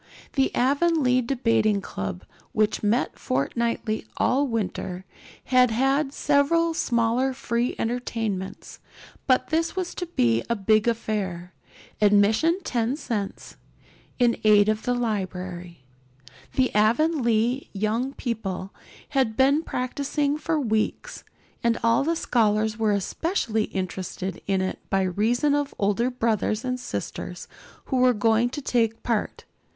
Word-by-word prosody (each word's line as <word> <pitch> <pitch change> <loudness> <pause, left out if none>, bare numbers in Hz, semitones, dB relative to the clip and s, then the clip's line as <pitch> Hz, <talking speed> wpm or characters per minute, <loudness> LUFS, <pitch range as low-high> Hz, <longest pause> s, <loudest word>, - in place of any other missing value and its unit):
The 270 -2 +2
Avonlea 275 -1 +3
Debating 230 -4 +1
Club, 95 - -5 0.3
which 215 -1 +1
met 220 +4 0
fortnightly 215 - -1
all 280 +3 +2
winter, 190 -5 -3 0.4
had 255 -1 +4
had 270 +5 +1
several 300 +4 +2
smaller 240 -1 +1
free 240 -1 -1
entertainments; 225 -5 -3 0.5
but 255 -1 +3
this 330 +2 0
was 370 -2 -3
to 355 - -5
be 115 - +2
a 235 - +2
big 215 +2 +2
affair, 195 -6 -2 0.5
admission 215 - +4
ten 240 -1 0
cents, 210 -9 -5 0.6
in 240 -2 +2
aid 210 -1 +5
of 215 0 0
the 245 - +1
library. 185 - -4 0.7
The 260 -1 +1
Avonlea 235 +1 +2
young 220 +6 -1
people 195 -7 -4 0.4
had 260 -6 0
been 275 +3 +4
practicing 280 +1 -1
for 315 +1 -1
weeks, 220 -5 -2 0.4
and 235 -1 +2
all 230 +3 +3
the 330 +3 0
scholars 215 -6 +1
were 220 -1 +1
especially 220 - -1
interested 185 -1 -5
in 195 -1 +1
it 185 - -3
by 195 0 +2
reason 225 +10 +1
of 290 -1 -1
older 210 +5 +1
brothers 225 -2 -1
and 255 0 -2
sisters 245 - -6 0.4
who 265 - -1
were 250 0 +5
going 225 +3 +2
to 285 +3 -6
take 230 -3 0
part. 230 -3 -2
230 Hz, 125 wpm, -25 LUFS, 210-265 Hz, 0.7 s, aid